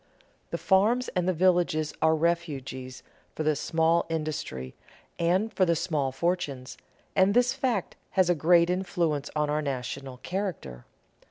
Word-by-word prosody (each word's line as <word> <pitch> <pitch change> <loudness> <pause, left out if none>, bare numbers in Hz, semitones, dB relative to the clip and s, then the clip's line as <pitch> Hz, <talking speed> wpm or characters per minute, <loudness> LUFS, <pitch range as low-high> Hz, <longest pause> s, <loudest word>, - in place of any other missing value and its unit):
The - - -3
farms 220 +6 +2
and 180 -1 -1
the - - +4
villages 175 -3 +2
are 160 0 +4
refuges 140 -6 -2 0.3
for 155 - -2
the 155 0 +2
small 165 +3 +1
industry 150 - -4 0.5
and 185 +6 +1
for 190 - +2
the 170 -2 +3
small 150 -5 -1
fortunes, 145 -4 -2 0.4
and 195 +2 +4
this 245 0 +4
fact 235 -8 -1 0.2
has 185 -2 +5
a 175 - +4
great 170 +2 +4
influence 170 -6 -1
on 150 -1 +1
our 150 +1 0
national 135 -1 -4
character. 170 - -5
165 Hz, 145 wpm, -27 LUFS, 145-185 Hz, 0.5 s, has